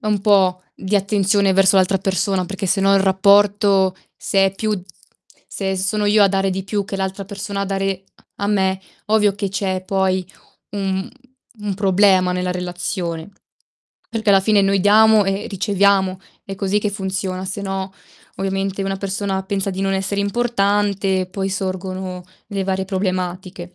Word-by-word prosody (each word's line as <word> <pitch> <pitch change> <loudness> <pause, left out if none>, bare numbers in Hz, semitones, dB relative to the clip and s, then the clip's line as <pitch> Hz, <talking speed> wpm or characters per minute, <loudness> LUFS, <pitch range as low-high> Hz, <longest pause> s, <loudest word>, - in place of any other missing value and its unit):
un 210 -2 0
po' 190 -3 +3
di 195 +2 -1
attenzione 200 0 +2
verso 195 +1 +4
l'altra 190 +1 +3
persona, 190 0 0
perché 195 +1 -4
se 195 +2 +1
no, 195 0 +4
il 195 - +4
rapporto 195 0 +3 0.2
se 195 0 +2
è 190 - -3
più 210 -2 -2 0.7
se 190 -1 -3
sono 200 +3 -1
io 205 0 +5
a - - +4
dare 195 0 0
di 190 0 -3
più 200 0 -2
che 195 - -5
l'altra 190 +1 -3
persona 200 0 -5
a - - 0
dare 195 -1 -2 0.3
a 200 0 -2
me, 190 -2 +1 0.3
ovvio 210 -2 +3
che 200 -1 -3
c'è 190 -1 -2
poi 190 -1 0 0.4
un 195 -1 -2 0.5
un 205 -2 -4
problema 190 -2 +3
nella 180 0 -1
relazione. 180 -1 -4 0.8
Perché 220 -2 0
alla 195 -1 +6
fine 210 0 +3
noi 195 0 +2
diamo 215 +1 +5
e 195 +1 -2
riceviamo, 195 -1 +1 0.2
è 195 0 -7
così 200 +1 0
che 210 - -1
funziona, 190 -2 -3
se 195 +2 -5
no, 195 -1 -4 0.4
ovviamente, 195 0 -2
una 195 0 -2
persona 195 0 -2
pensa 195 0 -2
di 190 +1 -5
non 195 0 0
essere 195 +1 -1
importante, 200 -3 0
poi 190 +1 -3
sorgono 185 -1 -4 0.2
le 195 -1 -3
varie 190 0 -1
problematiche. 185 -1 -4
195 Hz, 160 wpm, -20 LUFS, 190-200 Hz, 0.8 s, alla